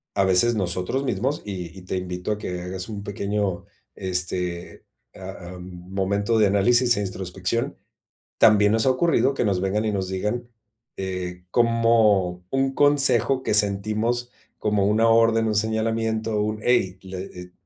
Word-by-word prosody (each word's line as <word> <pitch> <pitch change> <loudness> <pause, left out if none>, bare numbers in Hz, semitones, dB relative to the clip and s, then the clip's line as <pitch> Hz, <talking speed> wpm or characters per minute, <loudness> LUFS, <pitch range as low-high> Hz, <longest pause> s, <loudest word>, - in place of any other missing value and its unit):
a 100 - +3
veces 95 +6 +4
nosotros 95 +6 -1
mismos, 135 +2 -1
y 90 -4 -6
y - - -9
te 95 - -3
invito 90 +1 -4
a - - -5
que 90 -3 -5
hagas 95 +3 -5
un 105 -2 -6
pequeño, 100 -2 -2 0.3
este, 90 -1 -4 0.3
ah, 95 -1 -9
am, 90 - -9 0.3
momento 100 +3 0
de 105 - +5
análisis 120 +5 +3
e - - 0
introspección, 95 +3 -3 0.6
también 105 -1 +5
nos 115 +3 +2
ha - - +5
ocurrido 135 -2 +2
que 125 - -1
nos 95 -3 +1
vengan, 100 +3 -1
y 110 - 0
nos 95 -2 -2
digan, 105 +6 -3 0.5
eh, 90 -2 -5
como 115 -6 +2
un 135 0 0
consejo 140 -2 +3
que - - -1
sentimos 110 +4 +1 0.3
como 105 -2 +1
una 110 +2 +3
orden, 115 0 +4
un 110 - 0
señalamiento. 110 0 -1
Un: 105 0 -3
"Ey, 95 -7 +1
la 95 -1 -8
eh, 90 -1 -10
105 Hz, 155 wpm, -23 LUFS, 95-115 Hz, 0.6 s, de